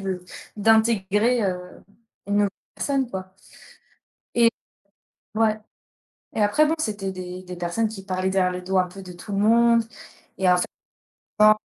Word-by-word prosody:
de 185 -2 -4 0.3
d'intégrer, 220 +1 +3
heu, 180 -2 -4 0.4
une 205 - -1
nouvelle 205 -1 +3 0.3
personne, 270 -3 -1
quoi. 185 0 -7 1.0
Et 235 -1 +6 0.9
ouais 220 -1 +2 0.8
et 215 - 0
après, 205 +9 +4
bon, 310 - +2
c'était 205 -8 -2
des 185 0 -7
des 180 0 -8
personnes 175 +6 -1
qui 205 -3 -8
parlaient 185 -1 -1
derrière 190 -1 +2
le 180 - -5
dos 190 +1 -1
un 180 - +1
peu 195 +2 -11
de 180 - -9
tout 190 +4 -10
le 195 - -1
monde 230 +2 +5 0.6
et 185 -1 +3
en 180 - +5
fait, 180 - 0 0.7
quand 215 0 +7
195 Hz, 160 wpm, -24 LUFS, 185-220 Hz, 1.0 s, quand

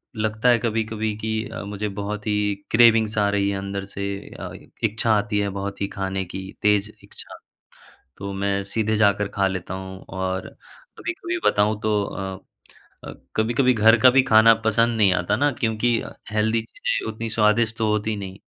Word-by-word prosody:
लगता 110 +2 0
है 120 - +5
कभी-कभी 110 -1 -2
कि 110 0 -3 0.2
अ, - - -6
मुझे 105 +1 -4
बहुत 105 +1 -4
ही 105 -1 +1 0.2
क्रेविंग्स 110 -2 +5
आ 100 -1 +3
रही 100 0 +1
है 100 - -2
अंदर 100 0 -4
से 100 0 -6 0.3
अ - - -6 0.3
इच्छा 110 +1 +1
आती 105 0 -1
है 100 -1 0
बहुत 100 0 -5
ही 100 - 0
खाने 95 0 -2
की 95 +2 -7
तेज़ 105 0 +2
इच्छा। - - -11 0.8
तो 100 0 -5
मैं 100 0 -1
सीधे 110 +2 -1
जाकर 105 -1 +3
खा 95 - +3
लेता 95 -1 -4
हूँ। 95 0 -7
और 95 0 -3 0.5
कभी-कभी 355 0 -4
बताऊँ 105 +1 +2
तो 105 -1 +1
अ, 95 -1 -6 1.0
कभी-कभी 120 +4 +2
घर 115 +1 +5
का 130 - +9
भी 135 - +5
खाना 110 0 +6
पसंद 115 +1 +2
नहीं 100 -4 +4
आता 90 -1 0
ना 145 +1 +2
क्योंकि 115 +1 +1 0.3
हेल्दी 110 +1 +1
चीज़ें 115 0 -3
उतनी 115 +1 -5
स्वादिष्ट 110 +1 +2
तो 110 -3 0
होती 105 +1 0
नहीं। 95 -1 -7
105 Hz, 170 wpm, -23 LUFS, 100-110 Hz, 1.0 s, का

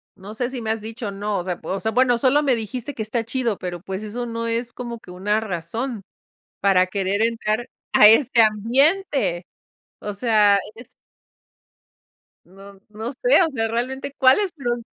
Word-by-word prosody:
no 200 +2 -10
sé, 240 +2 -2
si 260 -2 -6
me 220 - -1
has 225 -1 -3
dicho 225 0 -6
o - - -6
no, 205 +1 -3
o - - -4
sea 180 -2 -4
o 190 +4 -3
sea, 220 - -1
bueno, 245 +1 +3
solo 270 +4 +3
me 275 -4 +2
dijiste 235 +5 -5
que 220 - -3
está 225 +2 -2
chido, 235 -3 -1
pero 175 -2 -5
pues, 190 +1 -5
eso 235 +3 -4
no 230 0 -4
es 235 +1 -2
como 235 -2 -6
que 180 - -14
una 205 +4 0
razón, 215 +5 -4 0.6
para 190 -2 +4
querer 195 +2 -1
entrar, 230 0 -1 0.2
¡a 210 - +8
este 230 +1 +5
ambiente! 230 - +1 0.5
O 210 - -5
sea, 210 -2 +4 0.2
es 240 +3 -13 1.6
No 195 +1 -15
no 220 +3 -6
sé, - - +3
o 335 - +2
sea, 225 -1 0
realmente 255 +4 -3
cuáles 315 +9 +4
fueron 240 -5 -3
225 Hz, 180 wpm, -22 LUFS, 200-245 Hz, 1.6 s, a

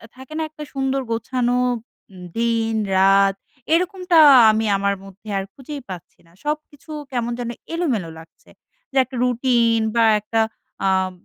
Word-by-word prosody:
থাকে 265 +4 -12
না 320 - -1
একটা 300 0 -10
সুন্দর 270 0 -1
গোছানো 245 +1 0 0.8
দিন, 230 -1 0 0.2
রাত, 195 0 +4 0.4
এরকমটা 365 0 +1 0.3
আমি 220 +1 0
আমার 200 0 0
মধ্যে 195 +2 -15
আর 195 - -1
খুঁজেই 280 +1 -8
পাচ্ছি 180 -2 -10
না। - - -23
সবকিছু 305 +1 -5 0.2
কেমন 240 -2 -2
যেন 240 -1 -3 0.2
এলোমেলো 255 - -1
লাগছে, 165 0 -18 0.4
যে - - -15
একটা 260 +1 -11
রুটিন 240 -2 +2 0.2
বা 230 - +4 0.2
একটা 225 +2 0 0.5
আপ 190 0 +1
240 Hz, 140 wpm, -21 LUFS, 205-275 Hz, 0.8 s, রাত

